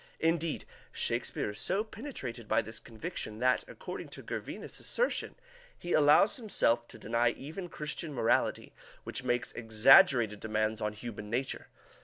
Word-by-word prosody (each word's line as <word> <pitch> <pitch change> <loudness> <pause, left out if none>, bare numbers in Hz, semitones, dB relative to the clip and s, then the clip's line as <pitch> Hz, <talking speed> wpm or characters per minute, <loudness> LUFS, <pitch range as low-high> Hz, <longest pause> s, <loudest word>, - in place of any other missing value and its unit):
Indeed, 165 0 0 0.3
Shakespeare - - -1
is 105 - -4
so 195 +3 +2
penetrated 215 - -7
by 110 - +2
this 110 +1 -5
conviction 110 -1 -6
that, 125 +2 +2
according - - -7
to - - -8
Gervinus's - - -6
assertion, - - -1 0.4
he 175 - -3
allows 150 +7 +5
himself 120 - +2
to - - -12
deny 115 +2 +1
even 165 +6 -7
Christian 150 +1 -4
morality, 120 -3 +1 0.3
which - - -4
makes 120 0 0
exaggerated 115 - +5
demands 110 0 -1
on 105 0 -1
human 105 -1 -7
nature. 125 +4 -2
120 Hz, 140 wpm, -31 LUFS, 110-165 Hz, 0.4 s, allows